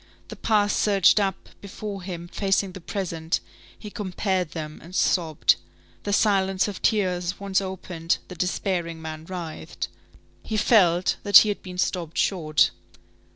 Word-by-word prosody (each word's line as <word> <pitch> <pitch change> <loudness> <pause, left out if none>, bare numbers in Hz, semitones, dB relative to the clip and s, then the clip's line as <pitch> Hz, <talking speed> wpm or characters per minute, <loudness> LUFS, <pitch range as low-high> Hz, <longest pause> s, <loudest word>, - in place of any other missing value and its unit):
The - - -7
past 205 -2 +2
surged 200 0 +4
up 195 -2 -2
before 200 0 -6
him 175 -2 -6
facing 195 +1 0
the 185 - -10
present; 165 -3 -2 0.4
he 210 - -9
compared 190 -3 -1
them 155 -2 -6
and 175 +3 -11
sobbed. 165 -6 +2 0.5
The 205 - -1
silence 195 -2 +2
of 200 -2 -6
tears 180 -5 0
once 200 -1 0
opened, 180 -3 -2
the - - -8
despairing 180 -2 -2
man 160 0 -7
writhed. 170 -3 -6 0.5
He 215 - -3
felt 185 -5 +4
that 205 -2 +8
he 215 - +7
had 205 - -3
been 180 -1 -9
stopped 175 -3 -2
short. 155 -6 +2
185 Hz, 145 wpm, -25 LUFS, 170-200 Hz, 0.5 s, that